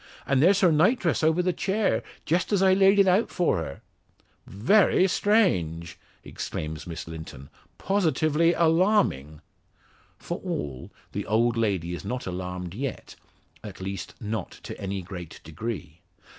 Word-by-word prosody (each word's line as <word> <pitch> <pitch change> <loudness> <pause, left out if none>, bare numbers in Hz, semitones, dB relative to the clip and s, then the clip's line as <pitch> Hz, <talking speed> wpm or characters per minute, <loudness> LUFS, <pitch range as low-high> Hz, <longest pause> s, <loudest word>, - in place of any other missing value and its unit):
And 135 -1 +2
there's 190 +6 +5
her 180 -3 +5
nightdress 175 - +2
over 160 +3 +3
the 180 0 +1
chair, 195 +4 0 0.2
just 170 +4 0
as 195 -2 +3
I 190 -1 +5
laid 195 +1 +5
it 200 -1 +5
out 190 +5 +3
for 175 - +1
her." 75 -4 -6 0.7
"Very 185 - +3
strange," 90 - +1 0.2
exclaims 75 0 -6
Miss 85 -1 -6
Linton, 80 -4 -9 0.3
"positively 165 -4 +2
alarming." 165 - +2 0.8
For - - -5
all, 70 -3 -5 0.2
the - - -4
old 115 +3 +2
lady 95 -7 -1
is 85 - -6
not 125 0 -4
alarmed 90 -1 -5
yet 130 +5 -5 0.5
at 105 -4 -9
least, 95 -1 -6
not 110 0 -4
to - - -8
any 95 -1 -3
great 90 -3 -9
degree. 85 -1 -6
120 Hz, 140 wpm, -26 LUFS, -, 0.8 s, there's